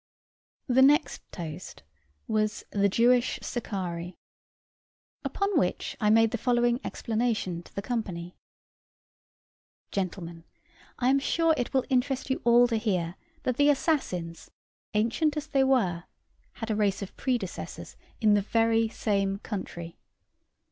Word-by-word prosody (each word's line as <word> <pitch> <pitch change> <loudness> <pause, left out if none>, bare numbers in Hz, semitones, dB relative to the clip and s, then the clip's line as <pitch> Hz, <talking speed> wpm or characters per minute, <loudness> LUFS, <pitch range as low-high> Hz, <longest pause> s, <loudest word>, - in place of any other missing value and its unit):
The 260 0 +3
next 290 +5 +4
toast 170 - -7 0.4
was 215 -1 0
The 200 0 +2
Jewish 245 +4 +3
Sicarii. 180 -6 -4 1.1
Upon 400 -4 0
which 180 - -1
I 210 - +3
made 225 +1 +5
the 240 - -2
following 240 0 +2
explanation 220 -7 -1
to - - -19
the 200 - -3
company: 185 -7 -4 1.6
"Gentlemen, 170 -3 -4 0.5
I 250 0 +2
am 275 - +4
sure 330 +3 +2
it 245 - -2
will 265 -1 +1
interest 265 0 0
you 265 - -1
all 240 +1 +6
to 230 - +1
hear 185 -7 -1 0.3
that 255 -1 -1
the 290 0 +5
assassins, 220 - -1 0.5
ancient 285 +8 +1
as 300 - -2
they 275 -3 +2
were, 205 -11 +1 0.5
had 225 -1 -5
a - - +1
race 205 -2 +1
of 190 - -9
predecessors 240 -8 -4 0.2
in 215 -2 +4
the 205 - +4
very 225 +2 +2
same 195 -3 0
country. 175 -5 -6
225 Hz, 130 wpm, -28 LUFS, 190-250 Hz, 1.6 s, all